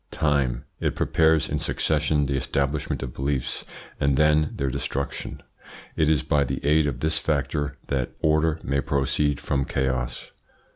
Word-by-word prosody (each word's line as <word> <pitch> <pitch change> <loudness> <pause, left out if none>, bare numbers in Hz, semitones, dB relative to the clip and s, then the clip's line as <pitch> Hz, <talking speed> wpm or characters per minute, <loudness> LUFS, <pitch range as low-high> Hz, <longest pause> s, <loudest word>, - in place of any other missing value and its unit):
TIME. 70 -5 0
It - - -1
prepares 80 -1 +3
in - - -2
succession 75 -1 +1
the 70 0 -1
establishment 70 +2 -1
of 65 - -6
beliefs 70 -1 -2 0.3
and 70 -1 +2
then 75 0 +4
their 70 -1 -1
destruction. 70 +2 -4 0.5
It 75 - +2
is 75 -4 +2
by 75 -1 +2
the 70 - -3
aid 75 +1 +4
of 70 - -3
this 80 +1 +3
factor 75 -1 -1
that 65 -3 -2
order 80 +1 +2
may 70 +1 0
proceed 70 +2 0
from 70 -1 0
chaos. 65 -3 -2
70 Hz, 150 wpm, -25 LUFS, 70-75 Hz, 0.5 s, then